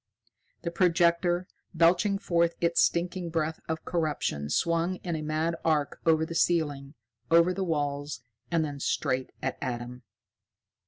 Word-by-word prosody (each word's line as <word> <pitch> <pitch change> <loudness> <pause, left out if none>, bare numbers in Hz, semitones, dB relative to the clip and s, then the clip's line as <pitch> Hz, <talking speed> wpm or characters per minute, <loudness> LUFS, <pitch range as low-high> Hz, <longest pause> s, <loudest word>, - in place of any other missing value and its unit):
The 170 - -2
projector, 175 0 +2 0.3
belching 175 +5 +4
forth 170 -3 +1
its 170 0 +2
stinking 175 0 0
breath 160 -1 -1
of 160 -1 -3
corruption 150 - -1
swung 170 - +1
in 175 -2 -2
a 155 - -3
mad 155 +2 -1
arc 150 -3 0
over 160 -1 +4
the 165 - -6
ceiling, 150 -4 0 0.3
over 170 +2 +5
the 190 +1 -2
walls 145 -5 -2 0.3
and 165 -2 +1
then 145 -2 -6
straight 130 -1 -1
at 130 - -2
Adam. 125 -1 -4
165 Hz, 140 wpm, -28 LUFS, 145-170 Hz, 0.3 s, over